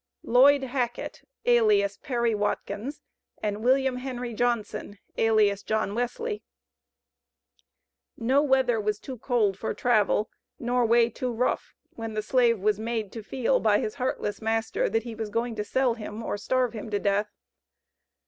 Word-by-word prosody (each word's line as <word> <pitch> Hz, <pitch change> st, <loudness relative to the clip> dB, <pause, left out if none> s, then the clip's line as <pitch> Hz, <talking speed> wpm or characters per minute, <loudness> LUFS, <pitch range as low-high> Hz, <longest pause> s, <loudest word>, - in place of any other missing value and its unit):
LLOYD 270 Hz, +3 st, +5 dB
HACKET, 245 Hz, -2 st, -3 dB, 0.2 s
alias 210 Hz, -4 st, +4 dB
Perry 235 Hz, 0 st, -1 dB
Watkins 215 Hz, +5 st, -3 dB, 0.4 s
and 210 Hz, 0 st, -3 dB
WILLIAM 265 Hz, 0 st, +3 dB
HENRY 250 Hz, -2 st, -5 dB
JOHNSON, 225 Hz, -3 st, -2 dB, 0.2 s
alias 215 Hz, -3 st, +3 dB
John 215 Hz, -1 st, -1 dB
Wesley. 415 Hz, -, -2 dB, 1.8 s
No 260 Hz, +5 st, +3 dB
weather 265 Hz, -5 st, +2 dB
was 210 Hz, 0 st, -1 dB
too 255 Hz, +2 st, -8 dB
cold 215 Hz, -6 st, +1 dB
for -, -, -3 dB
travel, 215 Hz, -3 st, +2 dB, 0.3 s
nor 245 Hz, 0 st, +1 dB
way 235 Hz, 0 st, +5 dB
too 250 Hz, +2 st, -3 dB
rough, 240 Hz, +2 st, -1 dB, 0.2 s
when 225 Hz, -1 st, -6 dB
the 215 Hz, -, -1 dB
slave 240 Hz, -2 st, +3 dB
was 210 Hz, +1 st, +1 dB
made 220 Hz, -2 st, -3 dB
to 225 Hz, -, -7 dB
feel 255 Hz, +4 st, 0 dB
by 210 Hz, -2 st, +3 dB
his 215 Hz, -, -2 dB
heartless 230 Hz, -5 st, -2 dB
master, 225 Hz, 0 st, 0 dB
that 225 Hz, 0 st, 0 dB
he 235 Hz, -1 st, -6 dB
was 220 Hz, -1 st, -5 dB
going 230 Hz, +2 st, -1 dB
to 210 Hz, -1 st, -3 dB
sell 255 Hz, +3 st, +1 dB
him 220 Hz, 0 st, -7 dB
or -, -, -2 dB
starve 250 Hz, +3 st, 0 dB
him 220 Hz, 0 st, -6 dB
to 205 Hz, -, 0 dB
death. 205 Hz, +1 st, 0 dB
230 Hz, 150 wpm, -27 LUFS, 215-250 Hz, 1.8 s, LLOYD